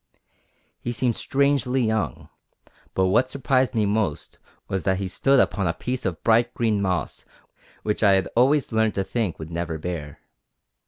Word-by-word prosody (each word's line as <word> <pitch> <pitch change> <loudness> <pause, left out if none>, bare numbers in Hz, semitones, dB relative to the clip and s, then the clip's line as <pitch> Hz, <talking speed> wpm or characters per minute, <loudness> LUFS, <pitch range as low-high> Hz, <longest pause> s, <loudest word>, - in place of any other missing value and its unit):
He 120 - -4
seemed 120 -1 0
strangely 135 -2 +1
young, 110 -1 -2 0.7
but 95 - +3
what 115 +8 +2
surprised 130 -2 +1
me 110 -2 +2
most 100 -6 -2 0.3
was 95 - -2
that 95 0 +1
he 95 0 -3
stood 135 +8 +3
upon 100 -6 +1
a 85 - -1
piece 125 +1 -3
of 85 -4 -5
bright 120 +1 +3
green 110 -4 +1
moss 90 -4 -2 0.6
which 105 - -1
I 100 -3 +5
had 95 -1 +2
always 135 +4 +3
learned 110 -1 +1
to 95 - 0
think 105 -3 -2
would 80 +1 -8
never 85 -1 -3
bear. 80 -3 -5
110 Hz, 165 wpm, -24 LUFS, 95-125 Hz, 0.7 s, I